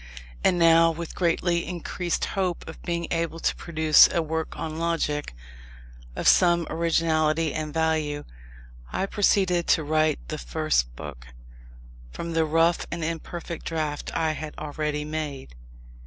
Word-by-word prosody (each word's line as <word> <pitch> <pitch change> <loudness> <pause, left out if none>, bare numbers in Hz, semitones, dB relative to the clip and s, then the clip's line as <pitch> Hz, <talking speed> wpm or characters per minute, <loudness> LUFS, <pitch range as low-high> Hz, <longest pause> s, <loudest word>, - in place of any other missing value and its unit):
And 180 - +3
now, 165 0 +6
with 165 0 -5
greatly 170 0 +1
increased 175 0 -2
hope 185 -3 -2
of 160 - -9
being 170 -1 -2
able 165 -1 -1
to - - 0
produce 160 -2 +5
a - - +1
work 160 0 -3
on 160 -1 -4
Logic, 165 -3 -1 0.8
of - - -1
some 175 -2 +5
originality 160 -1 +1
and 155 -1 -3
value, 155 -2 0 0.7
I 190 - -1
proceeded 190 -4 +2
to 160 - +3
write 155 +1 +2
the - - -4
First - - 0
Book, 65 -4 -9 0.8
from 170 - -6
the 160 0 +2
rough 165 +2 +2
and 170 -1 -4
imperfect 165 +1 -5
draft 155 -3 -3
I 160 -1 +1
had 155 0 -6
already 150 0 -3
made. 150 - -5
160 Hz, 140 wpm, -25 LUFS, 155-170 Hz, 0.8 s, now